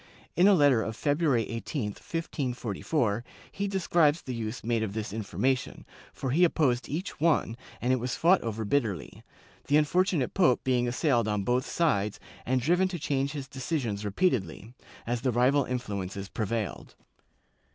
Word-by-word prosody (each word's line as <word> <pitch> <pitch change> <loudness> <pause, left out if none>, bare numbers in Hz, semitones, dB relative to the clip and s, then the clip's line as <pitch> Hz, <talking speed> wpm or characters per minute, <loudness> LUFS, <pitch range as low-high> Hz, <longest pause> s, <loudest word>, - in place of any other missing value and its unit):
In 180 +3 +5
a 205 - +7
letter 145 -8 +4
of 110 0 -4
February 145 -5 +1
18, 115 0 -3
1544, 125 - -2 0.3
he 200 +1 -2
describes 170 -5 +2
the 130 - -5
use 115 +1 -4
made 115 -1 0
of 105 -3 -2
this 110 -2 -4
information, 125 +4 -2 0.3
for 130 - -4
he 170 +7 +3
opposed 130 -8 +2
each 165 +5 -4
one, 155 -7 +2 0.2
and 125 +2 +1
it - - +2
was 125 +1 -2
fought 175 +3 +4
over 110 -1 -3
bitterly, 105 - -1 0.5
the 145 - +4
unfortunate 155 -2 +1
pope 175 -11 +3
being 125 -2 +1
assailed 120 -2 +1
on 105 -2 0
both 125 +5 0
sides 105 -12 0 0.3
and 130 +1 +2
driven 175 +7 +3
to 185 -1 -4
change 140 -2 -1
his 140 -3 -5
decisions 130 -6 -3
repeatedly, 105 - -1 0.3
as 120 0 -2
the 130 0 +1
rival 130 +4 +3
influences 100 -6 -4
prevailed. 110 - -3
125 Hz, 155 wpm, -28 LUFS, 110-150 Hz, 0.5 s, a